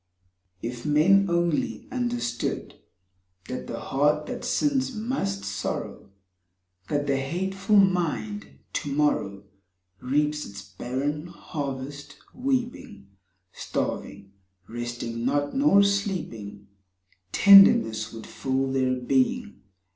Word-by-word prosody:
If 120 +1 -5
men 185 +7 +4
only 170 -2 0
understood 240 - -2 0.7
That 130 - -5
the - - -5
heart 150 +2 +1
that - - -6
sins 265 -3 0
must 215 - -2
sorrow, 100 0 -4 0.8
That 145 0 0
the 140 -1 +1
hateful 190 +9 -1
mind 160 - +2 0.3
to 145 - -3
morrow 120 -9 0 0.6
Reaps 150 +4 0
its 100 0 -9
barren 130 - -4
harvest, 145 -3 -6 0.2
weeping, 245 - -3 0.4
Starving, 100 - -4 0.4
resting 120 0 -5
not, 145 +3 0
nor 270 -8 +5
sleeping; 155 - -2 0.6
Tenderness 115 - +7
would 115 -1 -9
fill 135 0 -2
their 130 -1 +1
being. 240 - 0
145 Hz, 95 wpm, -26 LUFS, 120-195 Hz, 0.8 s, Tenderness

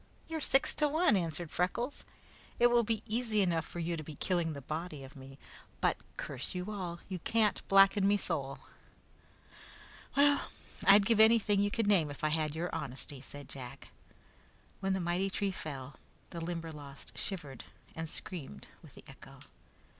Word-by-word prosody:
"You're 320 -1 -3
six 270 0 +3
to 300 - +3
one," 315 -5 +3
answered 170 -3 -2
Freckles. 235 +10 -1 0.5
"It 240 0 +5
will 240 0 +6
be 225 -1 -1
easy 220 -2 +1
enough 170 -3 0
for - - -9
you 170 0 -1
to 155 - -5
be 155 0 -9
killing 170 0 0
the 140 - -6
body 155 +1 -5
of 135 +2 -12
me, 135 0 -11 0.4
but, - - +3 0.2
curse - - -4
you 180 +3 -3
all, 175 -4 -5
you 185 -2 -4
can't 215 +3 +2
blacken 195 0 +6
me 205 +1 +4
soul!" 140 -8 -2 1.6
"Well, 285 0 +4 0.4
I'd 200 +1 +8
give 225 0 +3
anything 220 -2 +6
you 205 - +2
could 225 +1 0
name 190 -7 +4
if 145 +2 -9
I 155 - +3
had 155 -1 0
your 170 +2 -3
honesty," 135 +1 -5
said 145 0 -10
Jack. 135 0 -8 0.9
When 195 0 0
the 190 - 0
mighty 175 +2 0
tree 200 0 -1
fell, 140 -6 -7 0.3
the 170 -2 -5
Limberlost 160 -5 -6
shivered 145 - -5 0.3
and 160 0 -4
screamed 150 - -5
with - - -15
the - - -13
echo. - - -13
175 Hz, 170 wpm, -33 LUFS, 150-205 Hz, 1.6 s, I'd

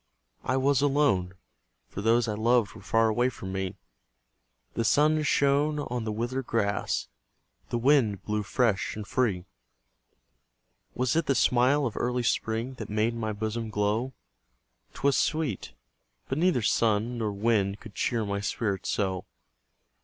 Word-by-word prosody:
I 130 - 0
was 140 +1 +2
alone, 135 -11 +2 0.5
for 100 - -6
those 115 +2 +3
I 110 - -1
loved 115 +1 +2
Were - - -12
far 115 0 +2
away 120 +3 +2
from 95 -6 -8
me; 95 -1 -3 1.0
The 115 - -1
sun 155 +6 +3
shone 145 0 +2
on 125 -5 -3
the 110 - -2
withered 120 +4 -3
grass, 100 -3 -1 0.6
The 120 - -1
wind 120 -6 +3
blew 105 0 -1
fresh 105 -1 0
and 105 -1 -6
free. 100 -7 0 1.5
Was 125 +3 0
it 165 -1 +1
the 135 - +2
smile 125 +4 +3
of 115 - -3
early 125 0 -1
spring 115 +2 -1
That 110 - -6
made 110 +2 +1
my 110 -2 -3
bosom 110 +2 -3
glow? 105 +5 -1 0.8
'Twas 140 -1 +2
sweet; 145 - -1 0.5
but 135 - -2
neither 170 -9 +2
sun 115 +2 +1
nor 110 -2 -1
wind 100 -1 +1
Could 110 - -12
cheer 115 +1 -1
my 100 0 -2
spirit 100 -1 -2
so. 95 -3 -1
115 Hz, 145 wpm, -27 LUFS, 105-130 Hz, 1.5 s, those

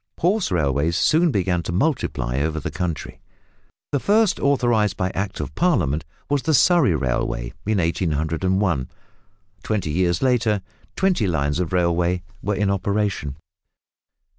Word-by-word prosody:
Horse 190 +4 +1
railways 75 0 +1
soon 165 +2 +3
began 95 - 0
to 85 - -5
multiply 85 - -1
over 80 +2 -1
the - - -5
country. 85 -4 -4 0.7
The 140 - +1
first 210 - +2
authorised 120 -7 +2
by 95 0 -1
Act 95 +1 -3
of - - -5
Parliament 85 - +1 0.2
was 145 -1 +1
the 160 +1 +2
Surrey 145 - +4
Railway - - -2
in 110 -1 +2
1801. 85 -1 0 0.7
Twenty 100 -8 -2
years 85 - +1
later 115 -6 +2 0.3
twenty 185 - +1
lines 75 -2 0
of 90 -3 -2
railway 90 0 +1 0.2
were 105 +1 -1
in 100 0 +1
operation. 100 -7 -1
95 Hz, 135 wpm, -22 LUFS, 80-120 Hz, 0.7 s, Surrey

